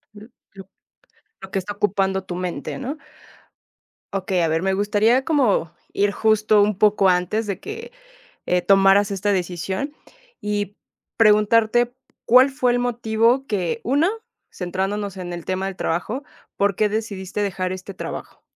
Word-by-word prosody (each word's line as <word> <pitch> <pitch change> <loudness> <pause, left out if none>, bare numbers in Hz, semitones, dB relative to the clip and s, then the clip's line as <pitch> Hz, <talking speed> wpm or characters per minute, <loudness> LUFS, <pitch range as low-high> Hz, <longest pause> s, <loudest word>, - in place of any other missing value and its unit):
L 210 +2 -12 0.3
lo 195 -1 -11 0.8
lo 190 - -9
que - - -1
está 195 +3 -5
ocupando 195 -1 0
tu 180 - -6
mente, 180 -1 -4
¿no? 270 +3 -5 1.2
Okey, 190 -1 -1
a 165 - +2
ver, 160 +1 0
me 190 +1 +1
gustaría 210 +6 +2
como 245 - +1 0.2
ir 205 0 +1
justo 215 -1 +3
un 205 -1 +1
poco 205 -2 +4
antes 180 +5 +1
de 200 -2 -4
que, - - -8 0.6
eh, 180 0 +1
tomaras 195 +2 +5
esta 200 +1 -1
decisión, 190 - -3 0.5
y 205 -1 -3 0.4
preguntarte 225 +2 +4 0.3
cuál 255 +3 +6
fue 260 -3 +1
el 245 - +1
motivo 240 +2 +1
que 200 +1 -2
una 290 +9 +2 0.4
centrándonos 195 +2 -3
en 175 -1 -6
el 170 -1 -6
tema 190 +1 -2
del 195 -1 -5
trabajo, 215 - -2 0.3
¿por 200 -1 +2
qué 210 +2 +2
decidiste 205 -2 -3
dejar 185 -2 -2
este 185 +1 -7
trabajo? - - -7
205 Hz, 150 wpm, -22 LUFS, 190-220 Hz, 1.2 s, cuál